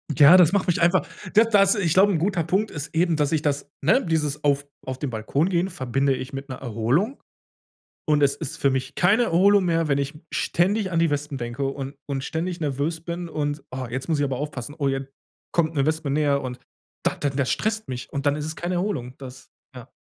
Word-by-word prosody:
Ja, 150 +7 +8
das 175 +1 +5
macht 200 -2 +1
mich 170 -1 +1
einfach 175 +2 +3 0.3
d 220 - +8
das 195 -2 +5
ich 180 -7 +1
glaube, 195 +2 +5
'n 165 - +1
guter 175 0 0
Punkt 195 +7 0
ist 150 +1 -7
eben, 170 -1 +2
dass 150 0 +1
ich 155 - +1
das 145 -1 -1
ne, 265 - +3
dieses 150 -3 -1
auf 145 -1 +2 0.2
auf 130 -1 -4
den 145 - -2
Balkon 125 - 0
gehen 180 0 +1
verbinde 135 -1 0
ich 130 +3 -6
mit 135 +1 -6
'ner 130 - -4
Erholung. 130 - 0 0.9
Und 150 -1 +3
es 140 -1 +3
ist - - -6
für 140 - +2
mich 130 -1 -2
keine 205 +7 +4
Erholung 200 0 +4
mehr, 165 -2 +1
wenn 140 - +2
ich 140 0 -2 0.2
ständig 190 +3 +1
an 165 - +1
die 165 -1 +3
Wespen 145 -1 -3
denke 120 +3 -3
und 135 0 -4
und 135 -2 -3
ständig 170 +3 -3
nervös 150 +3 -2
bin 170 +1 -5
und: 145 -2 -3
„Oh, 130 -1 -4
jetzt 130 +5 -4
muss 155 -3 0
ich - - +2
aber 135 -2 -1
aufpassen. 145 -1 -5
Oh, 140 -3 0
jetzt 135 0 -2 0.4
kommt 160 -2 +1
'ne 140 -1 +2
Wespe 155 -1 -1
näher“, 145 -1 +2
und 125 -1 -6 0.4
da - - +1
dann 140 -2 -2
das 140 -3 +1
stresst 220 0 -2
mich 125 0 -6
und 140 0 -3
dann 145 0 +3
ist 150 - -4
es 155 - -5
keine 175 +2 -3
Erholung. 175 -10 -2
Das 130 -1 -11 0.3
ja. - - -11
150 Hz, 230 wpm, -24 LUFS, 135-175 Hz, 0.9 s, Ja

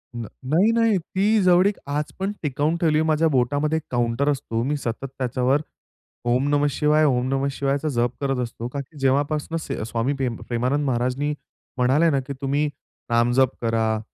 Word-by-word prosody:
न 120 -1 -4 0.2
नाही, 180 +9 +4
नाही. 230 -3 +3
ती 200 +5 +1
जवळीक 185 +2 +4
आज 145 +1 -2
पण 195 +1 -1
टिकवून 150 +2 0
ठेवली 160 -3 +2
आहे. 160 - +2
माझ्या 160 +1 +3
बोटामध्ये 145 +3 +1
एक 160 - -4
काउंटर 120 +3 +1
असतो. 130 -5 -1
मी 145 +4 0
सतत 120 0 -4
त्याच्यावर 130 +2 +1 0.6
ओम 125 +3 +2
नमः 145 0 +3
शिवाय, 150 +2 +2
ओम 125 -3 +2
नमः 135 +1 0
शिवायचा 140 +2 -1
जप 120 -3 +1
करत 135 -2 0
असतो 115 0 -6
कारण 140 +3 -5
की 155 - -16
जेव्हापासून 145 +4 0
स 160 - -6 0.2
स्वामी 120 +4 0
पेम 125 -3 -1
प्रेमानंद 125 +5 0
महाराजांनी 130 +3 0 0.4
म्हणाले 135 +7 +3
ना, 140 -3 +2
की 135 +2 -6
"तुम्ही 140 +2 +1 0.4
नामजप 120 +2 +3
करा." 110 -1 +1
140 Hz, 175 wpm, -23 LUFS, 125-150 Hz, 0.6 s, नाही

